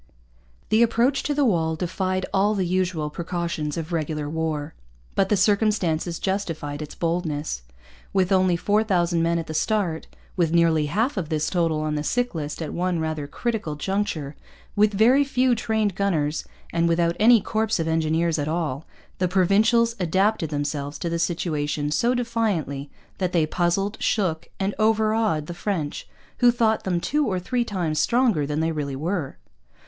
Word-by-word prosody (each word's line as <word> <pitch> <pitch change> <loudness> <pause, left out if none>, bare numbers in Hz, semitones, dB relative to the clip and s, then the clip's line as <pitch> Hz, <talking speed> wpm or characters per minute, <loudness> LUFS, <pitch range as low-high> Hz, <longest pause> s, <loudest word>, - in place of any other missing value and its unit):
The 220 - +4
approach 235 +4 +3
to 290 - -2
the 290 -1 +3
walls 160 -7 +1
defied 185 +2 -1
all 205 +2 +3
the 190 -2 0
usual 175 -4 -1
precautions 170 -2 -3
of 165 +1 -5
regular 155 -2 -2
war. 160 -1 -3 0.4
But 195 -1 +1
the 210 - +3
circumstances 190 -5 +1
justified 165 -7 -3
its 150 0 -7
boldness. 160 - -2 0.5
With 190 -1 +1
only 185 -2 +3
four 210 +4 +2
thousand 175 -5 +1
men 170 +1 +1
at 165 - -3
the 155 - -6
start, 180 -2 0 0.3
with 170 -4 +1
nearly 160 -3 +3
half 225 - 0
of 165 -5 -2
this 155 -2 -1
total 165 -4 +1
on 155 0 -1
the 150 - -1
sick 245 +8 0
list 150 0 -4
at 155 - -5
one 180 0 0
rather 155 -2 -3
critical 215 -4 -3
juncture, 160 -4 -2 0.4
with 210 0 +4
very 235 +7 +5
few 255 -2 +2
trained 220 -3 0
gunners, 165 -6 0 0.3
and 170 0 +2
without 170 0 +2
any 230 +2 +7
corps 220 0 -1
of 165 - -1
engineers 160 0 +1
at 145 - -1
all, 155 -3 -2 0.3
the 185 - +2
Provincials 210 +6 +3
adapted 190 0 +1
themselves 145 -1 -3
to 170 - -3
the 170 - -1
situation 150 -3 -1
so 240 +10 +2
defiantly 210 - -1 0.3
that 185 -2 -1
they 165 -3 +3
puzzled, 185 +6 0
shook, 180 -7 0
and 195 +1 0
overawed 215 -6 +2
the 175 - -6
French, 170 -5 -3 0.3
who 245 - +6
thought 230 -2 +1
them 180 -2 0
two 295 +10 0
or 190 -3 0
three 240 +7 -1
times 175 -9 -2
stronger 230 - +2
than 150 +1 -1
they 165 +1 +1
really 145 -3 -3
were. 160 0 -3
175 Hz, 170 wpm, -24 LUFS, 155-210 Hz, 0.5 s, any